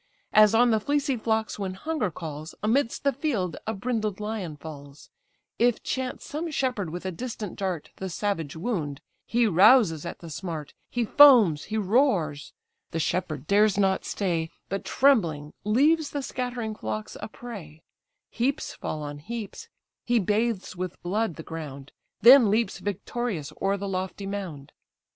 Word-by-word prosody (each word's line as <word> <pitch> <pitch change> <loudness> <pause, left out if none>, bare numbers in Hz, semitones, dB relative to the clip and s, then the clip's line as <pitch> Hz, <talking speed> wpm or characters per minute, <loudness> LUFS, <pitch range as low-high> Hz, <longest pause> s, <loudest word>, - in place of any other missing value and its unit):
As 215 0 +7
on 240 +1 +5
the 220 - +3
fleecy 285 +3 0
flocks 220 -2 -1
when 190 -2 -3
hunger 300 -1 -2
calls, 155 -1 -7
Amidst 230 +3 +1
the 280 -1 +2
field 235 - -1
a 220 - 0
brindled 215 -2 -2
lion 210 -7 -4
falls; 145 -2 -11 0.5
If 240 -1 +2
chance 260 -1 -3
some 320 +3 -4
shepherd 250 - -1
with 175 +3 -6
a 185 - -1
distant 220 -1 -6
dart 185 -5 -3
The 190 - -4
savage 170 -5 -2
wound, 160 - -3 0.3
he 235 0 +2
rouses 190 - +5
at - - -6
the 165 -2 -10
smart, 160 -3 -5 0.2
He 240 -1 -1
foams, 225 - +7
he 220 - -3
roars; 195 - +1 0.4
the 165 - -3
shepherd 155 -3 -1
dares 205 +2 +4
not 190 -1 +2
stay, 170 -5 -1 0.2
But 195 +1 -3
trembling 170 - +2
leaves 290 +8 +3
the 285 -2 -4
scattering 245 -4 -3
flocks 110 - -5
a - - -4
prey; 195 -10 -10 0.5
Heaps 260 +4 -1
fall 155 -1 -5
on 145 0 -6
heaps; 230 - -7 0.3
he 240 0 +2
bathes 210 -1 0
with 180 -1 -5
blood 195 0 -1
the 160 - -8
ground, 145 -4 -8 0.3
Then 245 -2 +9
leaps 220 +3 +1
victorious 200 -5 -3
o'er 195 +1 +1
the 200 0 -4
lofty 190 +1 -3
mound. 180 -8 -6
200 Hz, 155 wpm, -26 LUFS, 165-240 Hz, 0.5 s, Then